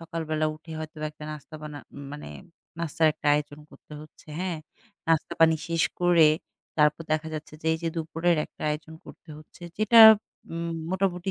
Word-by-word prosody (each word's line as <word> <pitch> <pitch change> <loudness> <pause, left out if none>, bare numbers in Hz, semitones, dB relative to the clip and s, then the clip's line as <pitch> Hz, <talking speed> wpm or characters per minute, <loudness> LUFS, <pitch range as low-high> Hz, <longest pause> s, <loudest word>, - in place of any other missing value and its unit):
সকালবেলা 155 -2 -2
উঠে 160 +1 -12
হয়তোবা 155 -1 -5
একটা 150 0 -12
নাস্তা 155 +1 -10
বানা 150 -1 -7 0.3
মানে 150 - -8 0.5
নাস্তার 165 -1 +1
একটা 155 - -8
আয়োজন 145 0 -3
করতে - - -17
হচ্ছে, 155 +1 -16
হ্যাঁ? 180 -3 -2 0.5
নাস্তা-পানি 160 0 +3
শেষ 165 -1 +1 0.2
করে 175 -3 +6 0.5
তারপর 150 +1 +3
দেখা 155 +1 -1
যাচ্ছে 155 0 -7
যে - - -6
এইযে 165 +1 -3
দুপুরের 165 +1 0
একটা - - -14
আয়োজন 155 +1 -5
করতে - - -15
হচ্ছে, 155 +3 -17 0.2
যেটা 215 +2 +5 0.5
উম 170 0 -3 0.2
মোটামুটি 190 -1 -1
160 Hz, 155 wpm, -26 LUFS, 155-170 Hz, 0.5 s, করে